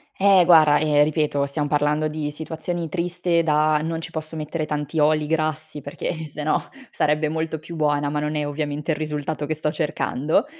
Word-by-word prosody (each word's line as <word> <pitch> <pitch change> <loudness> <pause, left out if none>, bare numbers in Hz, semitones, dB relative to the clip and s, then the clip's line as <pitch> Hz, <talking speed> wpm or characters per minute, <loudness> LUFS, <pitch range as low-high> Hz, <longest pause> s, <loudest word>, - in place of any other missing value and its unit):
Eh, 195 -2 +5
guarda, 155 -4 +6
ehm, 150 -1 +4
ripeto, 150 -2 0
siam 145 +1 -2
parlando 150 +1 +1
di 150 -1 -3
situazioni 160 +2 -4
triste 175 -1 0
da: 155 -1 +3
"Non 165 0 -3
ci - - -6
posso 160 0 -5
mettere 155 +1 -3
tanti 150 +1 -3
oli 150 0 +3
grassi, 155 -1 -1
perché, 145 +2 -6
eh, 160 -2 -4
sennò 150 +1 -1 0.3
sarebbe 150 +1 +1
molto 160 0 -2
più 165 +2 -9
buona," 145 -2 +1
ma 150 - -1
non 150 +1 -2
è 150 -1 -1
ovviamente 150 +1 -3
il 150 - -1
risultato 150 -1 -3
che 155 - -1
sto 150 0 -1
cercando. 150 -1 0
155 Hz, 185 wpm, -23 LUFS, 150-160 Hz, 0.3 s, guarda